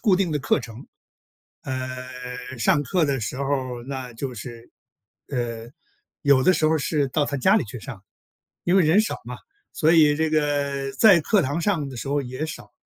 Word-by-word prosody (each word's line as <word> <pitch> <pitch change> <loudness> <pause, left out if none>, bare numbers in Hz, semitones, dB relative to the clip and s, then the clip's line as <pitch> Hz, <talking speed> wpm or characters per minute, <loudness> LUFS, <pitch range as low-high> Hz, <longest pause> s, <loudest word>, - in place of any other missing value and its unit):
固 205 -6 +3
定 180 -4 0
的 150 - 0
课 135 - +1
程。 115 +1 -10 0.8
呃， 130 -1 -4 0.7
上 145 +5 +3
课 170 +3 +1
的 140 -2 -1
时 120 +3 -4
候 140 - -2 0.3
儿 120 - -10
那 130 -3 -5
就 125 +2 -5
是， 120 +1 -9 0.6
呃， 120 -3 -4 0.5
有 140 -2 +4
的 - - +5
时 155 - +1
候 160 - +3
儿 - - +2
是 145 -1 0
到 145 +3 0
他 140 -1 -3
家 190 +10 +4
里 210 - +2
去 115 +1 -8
上， 110 -4 -9 0.6
因 175 - +2
为 190 - +5
人 165 +7 +5
少 220 - -3
嘛， - - -7 0.4
所 160 0 +3
以 150 -3 +5
这 160 +1 0
个 145 -3 0
在 195 -7 +6
课 205 +5 +2
堂 145 +6 -2
上 165 -7 0
的 130 - -9
时 115 - -5
候 145 0 +1
也 130 +4 -4
少， 160 - -9
140 Hz, 215 characters per minute, -24 LUFS, 130-160 Hz, 0.8 s, 在